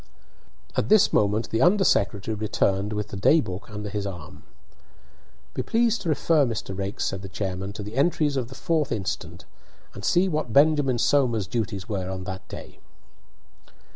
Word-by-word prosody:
At - - 0
this 215 -2 +5
moment 105 +2 +1
the 115 - +1
under 190 +3 +5
secretary 105 - +1
returned 105 -1 0
with 105 -1 -3
the - - -7
day 125 +11 +4
book 95 -8 -5
under 105 0 -6
his 100 0 -3
arm. 85 -6 -9 1.1
"Be - - -2
pleased 230 0 +1
to 175 - -3
refer, 155 0 +3
Mr. 115 -6 -3
Raikes," 100 +1 -3
said 95 - -3
the 95 - -8
chairman, 95 0 -4
"to 105 - -6
the 105 +2 -8
entries 145 +1 +1
of 130 -3 -1
the 135 - -11
4th 155 -2 0
instant, 95 -5 -4 0.5
and - - -9
see 180 +2 +3
what 155 -8 -2
Benjamin 145 -2 +4
Somers's 120 -5 +2
duties 100 -1 -3
were 95 -5 -3
on 95 -1 -4
that 95 0 -7
day." - - -10
110 Hz, 170 wpm, -25 LUFS, 95-145 Hz, 1.1 s, this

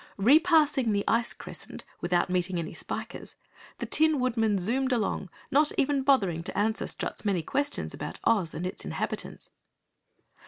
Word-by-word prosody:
Repassing 295 - +4
the 200 0 +1
ice 230 +1 +2
crescent - - -9
without 175 -1 +1
meeting 180 0 -1
any 165 -2 -4
Spikers, - - -6 0.4
the - - -4
Tin 315 -2 +3
Woodman 225 -5 +1
zoomed 255 +8 0
along, 210 -5 -1 0.2
not 295 +2 +4
even 280 0 +2
bothering 200 - +2
to 170 - -6
answer 220 +2 0
Strut's - - -4
many 195 -6 0
questions 285 - -2
about - - -6
Oz 200 -8 +2
and 175 - -3
its 185 - -5
inhabitants. - - -4
225 Hz, 150 wpm, -28 LUFS, 185-275 Hz, 0.4 s, Repassing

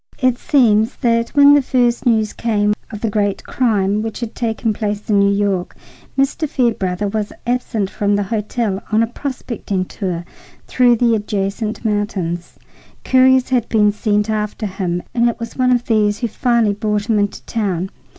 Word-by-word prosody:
It 255 -2 +1
seems 225 -5 +3
that 230 -1 +1
when 285 0 +7
the 290 - +5
first 245 -1 +1
news 220 -3 +2
came 210 -2 +1 0.2
of 210 -2 -8
the 225 - 0
great 205 -1 -1
crime 210 -4 0
which 225 -1 -5
had 235 -2 -5
taken 225 -1 -1
place 210 0 -3
in 200 - +4
New 200 0 +4
York, 200 -3 -1 0.4
Mr. 275 +3 0
Fairbrother 205 -7 0
was 210 0 -3
absent 235 -5 -1
from 205 +1 0
the 205 - 0
hotel 210 0 -2
on 220 +1 +3
a - - +3
prospecting 230 -6 -4
tour 180 -3 -4 0.4
through 245 -2 +3
the 235 0 +2
adjacent 210 +1 -2
mountains. 195 -5 -2 0.5
Couriers 260 0 +4
had 245 -3 0
been 210 -2 +3
sent 210 0 0
after 215 0 -2
him, 185 -3 -3
and 235 0 +3
it 235 - -5
was 230 -1 -6
one 255 -1 +2
of 245 -1 +1
these 210 -2 +2
who 235 - -2
finally 235 -2 +1
brought 210 0 -2
him 220 -3 +2
into 205 0 -2
town. 190 -5 -2
215 Hz, 170 wpm, -18 LUFS, 205-240 Hz, 0.5 s, when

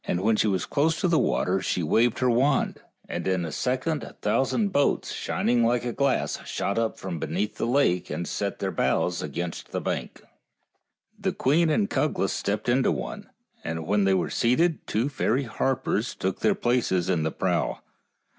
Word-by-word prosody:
When 100 +5 +2
she 110 - +2
was 95 -3 0
close 160 +3 +1
to 185 - +2
the 170 -2 +3
water 95 +1 +1
she 90 -2 -1
waved 115 +9 +2
her 125 +1 +2
wand, 135 +4 +2 0.3
and - - -4
in 90 -2 +1
a 80 - -5
second 130 - -1
a - - -9
thousand 200 - +1
boats, 145 -7 +1
shining 120 -1 0
like 120 0 +1
glass, 140 -2 0
shot 100 +3 -2
up 115 -1 -1
from 95 -6 -5
beneath 90 +7 -2
the - - -1
lake 120 -9 +2
and 80 +4 -3
set - - -2
their - - -2
bows 90 -1 0
against 85 +3 -5
the - - -2
bank. - - -4 1.0
The - - -1
queen 160 +5 +2
and 200 +6 +2
Cuglas 150 - 0
stepped 105 +3 -2
into 125 +2 +3
one, 60 -5 -5 0.3
and 80 -1 -4
when 100 +2 +2
they 95 0 +4
were 90 - -1
seated 155 +8 +1
two 115 +5 0
fairy 135 -2 0
harpers 120 -1 -1
took 95 0 -2
their 110 - +2
places 120 -8 +1
in 90 -4 +1
the 80 - 0
prow. - - -1
115 Hz, 180 wpm, -26 LUFS, 90-135 Hz, 1.0 s, they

